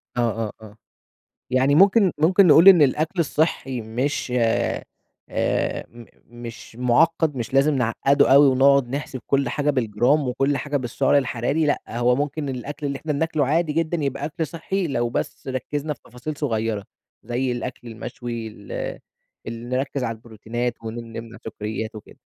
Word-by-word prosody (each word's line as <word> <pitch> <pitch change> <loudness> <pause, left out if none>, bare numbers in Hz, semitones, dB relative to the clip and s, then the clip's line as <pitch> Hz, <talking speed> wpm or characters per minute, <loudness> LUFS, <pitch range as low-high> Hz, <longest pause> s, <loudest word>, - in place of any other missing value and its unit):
آه، - - -2 0.3
آه، - - -7
آه، 105 -1 -13 0.7
يعني 130 +3 +3
ممكن 195 +2 +5
ممكن 180 +5 +5
نقول 160 +4 +7
إن 180 -4 +7
الأكل 155 +6 +1
الصحي 145 -5 0
مش 125 +5 -2
آآ، 115 -2 +1 0.5
آآ، - - -1
م 120 0 -13 0.2
مش 120 -1 -10
معقد 150 +5 +2
مش 120 +1 -5
لازم 140 +3 +4
نعقده 135 +3 +3
أوي، 140 +1 +8
ونقعد 135 -1 +4
نحسب 135 -1 -4
كل 140 -2 +1
حاجة 145 +4 0
بالجرام 125 +3 +2
وكل 135 +3 0
حاجة 145 0 -2
بالسعر 130 +2 +1
الحراري 135 +3 0
لأ، 145 - +1
هو 120 +1 +2
ممكن 145 +1 -2
الأكل 145 +4 -5
اللي 140 -1 -2
إحنا 150 +1 -3
بناكله 155 -1 0
عادي 155 +3 +1
جدًا 165 +2 0
يبقى 140 +1 -2
أكل 155 +1 -3
صحي، 175 +3 -3
لو 120 -5 -1
بس 120 - -4
ركزنا 145 +3 -3
في 135 - -21
تفاصيل 125 +5 -7
صغيرة. 110 -7 -1 0.4
زي 125 +3 -1
الأكل 120 0 -5
المشوي 115 0 -6
ال 105 -2 -12 0.8
ال 115 +2 -6
نركز 135 +1 -1
على 115 -2 -2
البروتينات 115 +2 -4
ونم 115 +1 -6
نمنع 115 0 -8
سكريات 110 0 -5
وكده. 105 - -12
130 Hz, 160 wpm, -23 LUFS, 120-150 Hz, 0.8 s, أوي